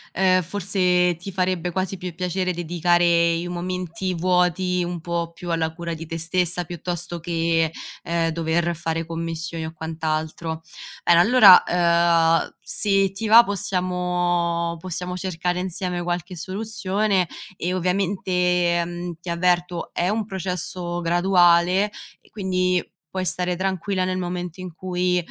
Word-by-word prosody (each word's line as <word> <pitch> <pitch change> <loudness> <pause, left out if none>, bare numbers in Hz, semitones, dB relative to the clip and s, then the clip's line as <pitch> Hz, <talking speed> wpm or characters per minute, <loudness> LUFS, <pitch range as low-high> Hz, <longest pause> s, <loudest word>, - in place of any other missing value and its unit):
uhm, 185 0 +4
forse, 180 -1 +1
ti 195 +3 -7
farebbe 185 -1 -1
quasi 190 +2 -2
più 180 -2 -6
piacere 185 +1 -1
dedicare 170 0 +2
i 170 +1 -3
momenti 180 +1 -3
vuoti 180 +1 +1
un 175 -1 -4
po' 170 0 -3
più 175 +1 -6
alla 160 -1 0
cura 170 -1 -4
di 165 0 -7
te 165 - -4
stessa, 175 +1 -1
piuttosto 175 0 -5
che, 165 -1 0 0.3
ehm, 170 -1 0
dover 170 +1 0
fare 165 0 -3
commissioni 165 0 -4
o 160 - -7
quant'altro. 160 0 -3 0.4
Bene, 170 -1 +5
allora, 205 -1 +8
ehm, 170 -1 +3
se 195 -2 +1
ti 195 +3 -4
va, 230 +2 +9
possiamo 175 -3 -1
possiamo 180 +1 -5
cercare 180 -1 -2
insieme 180 -1 -3
qualche 175 +1 -3
soluzione, 195 0 -1 0.3
e, 180 +1 -2
ovviamente, 180 -2 +1
mhmm, 175 +1 -5
ti 175 - -7
avverto, 175 0 0
è 175 - 0
un 215 +1 -1
processo 180 -2 -4
graduale, 175 +2 +3 0.4
quindi 205 -3 -7 0.6
puoi 185 +2 -3
stare 180 0 0
tranquilla 190 0 -1
nel 185 0 -1
momento 180 0 -4
in 180 -2 -7
cui, 180 +1 -1
175 Hz, 135 wpm, -23 LUFS, 170-185 Hz, 0.6 s, va